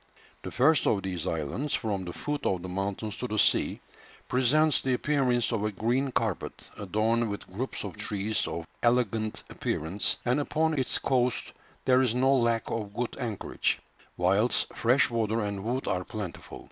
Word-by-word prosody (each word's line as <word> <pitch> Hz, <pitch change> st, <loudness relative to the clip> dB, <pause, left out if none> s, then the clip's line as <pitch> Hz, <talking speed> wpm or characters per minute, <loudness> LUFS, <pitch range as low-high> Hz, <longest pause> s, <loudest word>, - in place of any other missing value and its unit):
The -, -, -5 dB
first 140 Hz, +6 st, +3 dB
of 100 Hz, -3 st, +2 dB
these 90 Hz, -2 st, -3 dB
islands, 80 Hz, -, -1 dB
from 100 Hz, -5 st, -2 dB
the 85 Hz, -, -5 dB
foot 145 Hz, +10 st, -4 dB
of 90 Hz, -2 st, 0 dB
the -, -, -4 dB
mountains 100 Hz, +3 st, -3 dB
to 125 Hz, -, -3 dB
the 110 Hz, -, -3 dB
sea, -, -, +3 dB, 0.5 s
presents 145 Hz, +4 st, +3 dB
the 130 Hz, -1 st, +1 dB
appearance 125 Hz, -4 st, +1 dB
of 110 Hz, -3 st, -1 dB
a 105 Hz, -, 0 dB
green 120 Hz, +7 st, 0 dB
carpet, 110 Hz, -6 st, -2 dB
adorned 110 Hz, +3 st, +1 dB
with 100 Hz, -, -5 dB
groups 130 Hz, +7 st, -3 dB
of 100 Hz, -5 st, -6 dB
trees 105 Hz, +2 st, -1 dB
of 85 Hz, -, -4 dB, 0.2 s
elegant 115 Hz, -3 st, +1 dB
appearance, 85 Hz, +7 st, -1 dB
and 125 Hz, +3 st, +2 dB
upon 160 Hz, +2 st, +1 dB
its 130 Hz, -4 st, +3 dB
coast 125 Hz, -2 st, 0 dB, 0.3 s
there 130 Hz, 0 st, +5 dB
is 125 Hz, -3 st, +2 dB
no 130 Hz, +2 st, +4 dB
lack 115 Hz, -3 st, +1 dB
of 105 Hz, -3 st, -4 dB
good 120 Hz, -1 st, -2 dB
anchorage, 115 Hz, -6 st, -1 dB, 0.4 s
whilst 100 Hz, +7 st, +2 dB
fresh 125 Hz, +4 st, +3 dB
water 115 Hz, -1 st, 0 dB
and 100 Hz, -1 st, -3 dB
wood 125 Hz, +4 st, -2 dB
are 90 Hz, 0 st, 0 dB
plentiful. 100 Hz, -3 st, -7 dB
115 Hz, 170 wpm, -28 LUFS, 100-125 Hz, 0.5 s, there